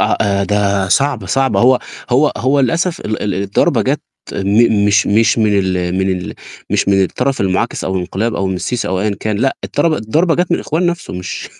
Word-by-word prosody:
آه، - - +2
آآ 100 -1 +1
ده 100 -1 0
صعبة، 135 -4 +1
صعبة، 135 +7 +1
هو 125 +1 +5 0.3
هو 140 +5 +3
هو 135 +3 +1
للأسف 165 +6 0
ال 110 - -4
ال 100 -2 -1
الضربة 100 +1 +1
جات - - 0 0.3
م 100 +1 +2
مش 105 +1 +3
مش 110 +2 +3
من 105 -2 +2
ال 90 -2 -1
من 95 0 +1
ال 90 -1 -4 0.4
مش - - +1
من 95 -1 +4
الطرف 125 +8 -1
المعاكس 95 +4 -1
أو 95 - -2
الانقلاب 95 +5 -2
أو 95 - -1
من 95 - -2
السيسي 120 +6 -3
أو 95 0 -1
أيًا 105 0 0
كان 110 -1 -1
لأ، 135 +5 0
الترب 155 +3 0
الضربة 155 +6 +1
جات 180 +1 0
من - - +3
الإخوان 165 +4 -1
نَفْسه 175 0 -3
مش 90 0 -6
105 Hz, 205 wpm, -16 LUFS, 95-135 Hz, 0.4 s, هو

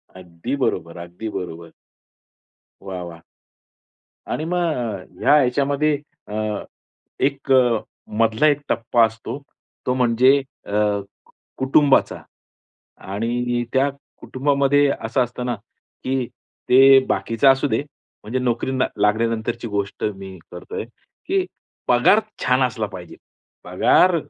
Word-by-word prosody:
अगदी 90 +8 -5
बरोबर, 85 +1 -3
अगदी 90 +6 -7
बरोबर. 85 -4 -7 1.1
वाह, 95 -2 -6
वाह! 85 -1 -10 1.1
आणि 155 - -2
मग 180 +2 -1
अ, 120 - -1 0.2
ह्या 150 0 +5
याच्यामध्ये 140 +4 +1 0.3
अ, 105 0 -3 0.6
एक 135 0 -1
अ, 125 -4 +4 0.4
मधला 115 +5 +3
एक 145 -1 +3
टप्पा 115 0 +3
असतो, 115 +4 -6 0.5
तो 125 - +1
म्हणजे 125 +2 +4 0.3
अ, - - -7 0.9
कुटुंबाचा 135 +1 +3 0.9
आणि 120 +3 -1
त्या 135 +1 +3 0.3
कुटुंबामध्ये 140 +1 +2
असं 125 +4 0
असतं 125 +1 -6
ना, 120 - 0 0.5
की 130 -1 0 0.4
ते 135 +1 +8
बाकीचं 115 +7 +2
असू 135 +2 -1
दे, 110 +3 0 0.4
म्हणजे 115 +5 -2
नोकरी 125 0 -1
ना 130 -1 +1
लागल्यानंतरची 115 +2 0
गोष्ट 100 -1 -3
मी 95 -1 -9
करत 90 0 -11
आहे. - - -3 0.4
की 380 0 +1 0.4
पगार 215 - +5 0.2
छान 130 +1 +3
असला 115 -4 0
पाहिजे. 90 -3 -10 0.5
पगार 180 -1 +4
120 Hz, 115 wpm, -21 LUFS, 105-135 Hz, 1.1 s, ते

